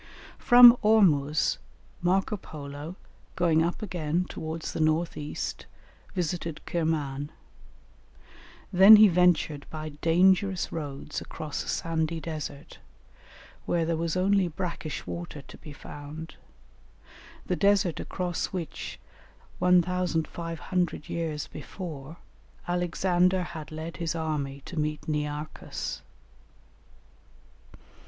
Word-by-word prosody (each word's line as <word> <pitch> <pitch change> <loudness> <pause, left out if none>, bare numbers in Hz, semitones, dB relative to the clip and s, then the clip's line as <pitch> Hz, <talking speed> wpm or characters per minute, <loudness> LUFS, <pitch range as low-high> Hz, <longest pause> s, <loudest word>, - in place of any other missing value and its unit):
From 245 0 +9
Ormuz, 165 -9 +3 0.4
Marco 190 +4 +1
Polo, 150 -2 -8 0.4
going 165 -3 +3
up 170 +6 -1
again 175 -2 -1
towards 160 0 -5
the - - -4
north 155 +2 +1
east, 150 0 -5 0.5
visited 170 -2 -2
Kirman; 150 -4 -1 1.4
then 195 +4 +10
he 215 0 +9
ventured 175 -5 +2
by 155 -1 -5
dangerous 180 +5 +2
roads 145 -2 -5
across 155 -3 -5
a - - -12
sandy 165 0 -1
desert, 155 -3 -7 0.9
where 170 -1 +1
there 165 0 0
was 165 +2 -1
only 195 0 +3
brackish 170 -2 -5
water 170 -4 -6
to - - -13
be 155 - -11
found, 145 +3 -9 1.1
the - - 0
desert 200 -4 +2
across 180 -2 -2
which, 180 -4 -6 0.6
1500 175 -1 0
years 160 -3 -3
before, 160 -4 -8 0.5
Alexander 180 +1 +1
had 160 -3 -8
led 160 +1 -6
his 170 -1 -2
army 145 -4 -3
to 175 - -5
meet 150 0 -2
Nearchus. 150 0 -4
165 Hz, 100 wpm, -27 LUFS, 155-180 Hz, 1.4 s, then